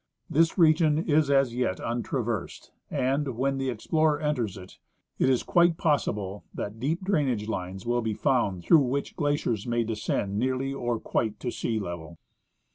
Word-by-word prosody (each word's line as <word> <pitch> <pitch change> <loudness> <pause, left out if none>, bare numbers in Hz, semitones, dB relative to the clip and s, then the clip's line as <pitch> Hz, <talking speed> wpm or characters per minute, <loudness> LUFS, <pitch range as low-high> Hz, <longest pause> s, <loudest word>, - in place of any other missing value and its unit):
This 165 +4 +3
region 155 -2 +4
is 155 -2 +2
as 135 -3 +3
yet 120 -7 -1
untraversed; 120 -2 -3 0.2
and 135 -2 -1
when 135 +1 0
the 135 -1 -1
explorer 150 +6 +1
enters 125 -10 -1
it, 90 0 -12 0.4
it 130 - +3
is 130 -2 +2
quite 170 -2 +3
possible 105 - -1
that 105 +2 -5
deep 160 - -1
drainage 140 - 0
lines 95 -2 -4
will 120 +1 +1
be 110 -2 -2
found 105 -10 +1
through 160 - +6
which 135 +2 -2
glaciers 145 - -1
may 120 0 +1
descend 105 -2 -2
nearly 130 +2 -1
or 120 -4 -2
quite 110 -2 -1
to 125 - -2
sea 115 -1 -2
level. 85 -4 -6
125 Hz, 160 wpm, -27 LUFS, 110-145 Hz, 0.4 s, through